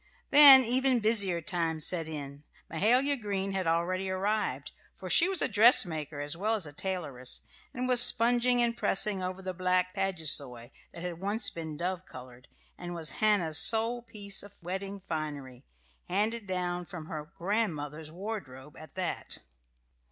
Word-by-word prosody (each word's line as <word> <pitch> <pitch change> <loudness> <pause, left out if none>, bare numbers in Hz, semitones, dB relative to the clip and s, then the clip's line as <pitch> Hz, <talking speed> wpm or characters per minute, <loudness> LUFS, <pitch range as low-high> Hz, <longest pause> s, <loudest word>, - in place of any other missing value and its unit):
Then 280 -3 +10
even 255 +1 +1
busier 200 -6 +1
times 165 -3 -1
set 165 -3 +2
in. 145 -2 -8 0.3
Mahala 245 - +2
Green 195 -2 -3
had 190 -3 -3
already 180 +3 -1
arrived, 185 -8 -2 0.2
for 185 -2 -7
she 350 - +4
was 385 -3 +2
dressmaker 175 - +4
as 145 +2 -4
well 215 +6 -1
as 200 -6 0
tailoress, 150 -10 -5 0.3
and 255 -2 -4
was 250 -1 +4
sponging 245 +1 +4
and 235 0 0
pressing 200 -3 +1
over 185 +1 -5
the 185 0 -4
black 185 0 0
paduasoy 155 - 0 0.2
that 170 - -10
had 175 -2 -6
once 205 +5 0
been 160 -2 -7
dove 180 +1 -4
coloured 125 -1 -13 0.3
and 175 0 -7
was 160 -2 -3
Hannah's 180 -8 +2
sole 230 +2 +2
piece 205 -4 -3
of 205 0 -14
wedding 195 +3 -5
finery, 145 -7 -7 0.4
handed 210 +3 -2
down 180 -1 -3
from 175 -3 -9
her 155 +1 -8
grandmother's 160 -6 -3
wardrobe 155 -7 -8
at 155 - -14
that. 185 -2 -4
185 Hz, 150 wpm, -29 LUFS, 160-215 Hz, 0.4 s, Then